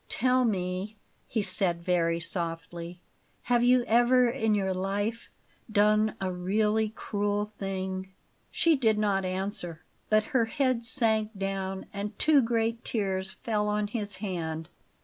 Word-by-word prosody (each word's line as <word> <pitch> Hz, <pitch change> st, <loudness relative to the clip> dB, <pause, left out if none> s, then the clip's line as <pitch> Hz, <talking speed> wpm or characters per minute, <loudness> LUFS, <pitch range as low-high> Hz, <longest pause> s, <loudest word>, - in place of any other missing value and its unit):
"Tell 255 Hz, +1 st, +2 dB
me," 190 Hz, 0 st, -2 dB, 0.3 s
he 220 Hz, -3 st, -1 dB
said 180 Hz, -2 st, +1 dB
very 170 Hz, -2 st, +1 dB
softly; 170 Hz, 0 st, -4 dB, 0.4 s
"have 240 Hz, -1 st, +2 dB
you 250 Hz, 0 st, +5 dB
ever 245 Hz, +2 st, +4 dB
in 225 Hz, -3 st, +1 dB
your 190 Hz, -2 st, 0 dB
life 205 Hz, +5 st, -2 dB, 0.4 s
done 215 Hz, +1 st, +3 dB
a 190 Hz, -1 st, -1 dB
really 210 Hz, +4 st, +1 dB
cruel 205 Hz, -1 st, -2 dB
thing?" 190 Hz, -2 st, -5 dB, 0.4 s
She 330 Hz, -1 st, +3 dB
did 225 Hz, -6 st, +2 dB
not 200 Hz, -2 st, +1 dB
answer, 185 Hz, -3 st, -3 dB, 0.3 s
but 215 Hz, 0 st, +4 dB
her 245 Hz, -3 st, +4 dB
head 255 Hz, 0 st, 0 dB
sank 220 Hz, -4 st, +2 dB
down, 195 Hz, -1 st, -3 dB
and 205 Hz, +1 st, -5 dB
two 305 Hz, -3 st, +5 dB
great 230 Hz, 0 st, 0 dB
tears 190 Hz, -3 st, -2 dB
fell 210 Hz, -2 st, 0 dB
on 210 Hz, 0 st, 0 dB
his 205 Hz, -2 st, -3 dB
hand. 165 Hz, -5 st, -4 dB
205 Hz, 135 wpm, -28 LUFS, 190-225 Hz, 0.4 s, you